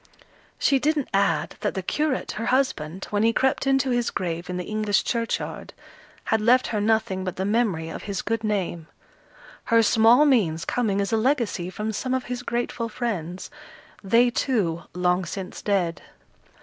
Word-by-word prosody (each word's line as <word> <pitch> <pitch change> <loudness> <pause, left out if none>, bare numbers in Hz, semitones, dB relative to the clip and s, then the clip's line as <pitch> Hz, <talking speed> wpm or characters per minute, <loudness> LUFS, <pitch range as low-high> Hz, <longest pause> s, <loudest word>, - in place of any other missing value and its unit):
She 275 - +3
didn't 295 -1 0
add 195 -6 +1
that - - -2
the 190 - -3
curate, 295 +6 -1
her 225 +2 -4
husband, 190 - 0
when 205 0 +1
he 225 +1 +4
crept 265 +3 +1
into 270 -1 +2
his 240 -1 +1
grave, 170 -1 -4
in 180 - -3
the 180 - -3
English 215 0 0
churchyard, 230 -1 -3 0.5
had 220 -1 +1
left 250 +4 +4
her 210 -2 -1
nothing 220 -3 +1
but 185 -2 -4
the 190 - -2
memory 205 -7 0
of - - -6
his 200 -2 -4
good 225 0 -2
name, 185 -6 -2 0.8
her 230 0 +4
small 225 +6 +5
means 180 - +2
coming 205 -5 0
as 200 +3 -2
a - - +4
legacy 225 -7 0
from 210 +4 -3
some 255 +5 -2
of 260 - -1
his 245 0 -5
grateful 235 -1 -2
friends, 190 -7 -4 0.5
they, 235 +5 +4
too, 200 -11 0
long 180 +1 +1
since 185 +2 -6
dead. 175 -6 0
215 Hz, 170 wpm, -24 LUFS, 185-245 Hz, 0.8 s, small